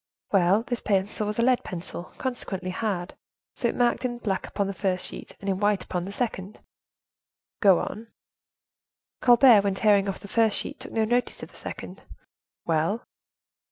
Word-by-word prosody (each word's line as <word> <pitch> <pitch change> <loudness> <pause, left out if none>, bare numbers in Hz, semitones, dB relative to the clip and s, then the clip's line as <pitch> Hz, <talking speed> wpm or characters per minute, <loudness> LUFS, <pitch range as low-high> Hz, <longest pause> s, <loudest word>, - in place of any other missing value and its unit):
"Well, 195 +2 +4
this 245 -2 -3
pencil 205 +1 0
was 210 - -3
a 235 - +2
lead 255 0 +3
pencil, 175 0 -6
consequently 195 -8 -3
hard; 190 -3 -3 0.4
so, 240 - -1
it - - -2
marked 245 +1 +2
in 240 -1 -2
black 200 -5 -2
upon 200 - -1
the 195 - -3
first 185 -1 -1
sheet, - - -6
and 200 - -8
in 190 -1 0
white 205 -2 +2
upon 180 -1 -3
the 195 - -6
second." 205 -3 -4 1.0
"Go 195 -4 +7
on." 225 +2 -6 1.1
"Colbert, 245 -3 +7
when 200 -1 0
tearing 200 -1 +3
off 195 - -4
the 200 - -11
first 220 0 +2
sheet, - - -4
took - - -8
no 220 -1 +1
notice 245 +2 -1
of - - -9
the - - -20
second." - - -8 0.6
"Well?" 165 +8 0
205 Hz, 175 wpm, -26 LUFS, 190-230 Hz, 1.1 s, Go